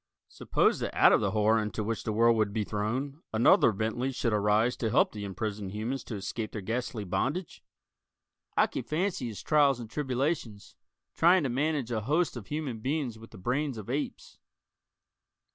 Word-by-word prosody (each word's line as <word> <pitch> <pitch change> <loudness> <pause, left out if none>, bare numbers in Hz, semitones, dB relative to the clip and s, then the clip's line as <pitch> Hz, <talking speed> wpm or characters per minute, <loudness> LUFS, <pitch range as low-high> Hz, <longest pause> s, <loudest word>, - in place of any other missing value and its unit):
Suppose - - +1
that - - -4
out - - +6
of - - +4
the - - +1
horror 110 +1 +3
into 105 0 -3
which 115 +2 -3
the 110 - -1
world 115 +2 +4
would 110 -2 +1
be 110 0 -1
thrown, 125 +9 -3
another 110 +1 +5
Bentley 110 +6 -2
should 120 -3 -1
arise 105 +4 +2
to 115 - -1
help - - +3
the 105 -1 -7
imprisoned 100 0 -4
humans 115 +5 -3
to 110 - -5
escape 105 +2 -4
their 105 - -4
ghastly 115 +2 -3
bondage? 135 - -2 0.9
I - - +6
can - - -4
fancy 155 - -2
his 110 -3 -7
trials 145 -4 +3
and 115 - -7
tribulations, 130 -5 -2 0.4
trying 175 +1 +4
to 135 - 0
manage 140 -1 -1
a 110 -2 -1
host 155 - +1
of 115 -5 -8
human 145 -7 -3
beings 130 -2 -2
with 115 - -12
the - - -13
brains 130 +6 -1
of 110 +2 -6
apes. 145 +2 -4
115 Hz, 180 wpm, -29 LUFS, 110-135 Hz, 0.9 s, out